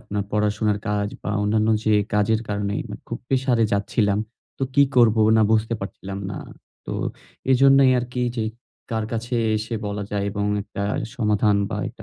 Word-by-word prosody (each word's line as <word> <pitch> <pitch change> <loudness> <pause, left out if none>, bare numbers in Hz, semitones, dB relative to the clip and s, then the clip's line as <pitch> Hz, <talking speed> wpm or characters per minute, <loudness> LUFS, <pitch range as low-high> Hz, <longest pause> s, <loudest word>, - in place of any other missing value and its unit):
আপনার 105 0 -3
পড়াশোনার 105 0 +1
কাজ 105 0 0
বা - - -3
অন্যান্য 110 +1 +2 0.2
যে 110 - +3 0.2
কাজের 105 +2 +2
কারণে 100 0 -1 0.3
খুব - - -4
প্রেশারে 130 -3 +2
যাচ্ছিলাম। 100 0 +1 0.4
তো - - -4
কি 140 - +6
করবো 115 -2 +5
না 110 - +5
বুঝতে 110 +1 +2
পারছিলাম 95 0 -6
না। - - -5 0.5
তো - - -4 0.6
এজন্যই 135 0 +6
আরকি 125 +1 -5
এই - - -1
যে 110 - 0 0.5
কার 110 -1 -1
কাছে 115 +2 -3 0.2
এসে 110 +2 -4
বলা 105 0 -3
যায় 100 -1 -1
এবং 100 0 -2 0.2
একটা 100 - -6 0.3
সমাধান 105 -3 +2
বা 105 - -2
একটা 115 -1 -13
110 Hz, 165 wpm, -23 LUFS, 105-115 Hz, 0.6 s, কি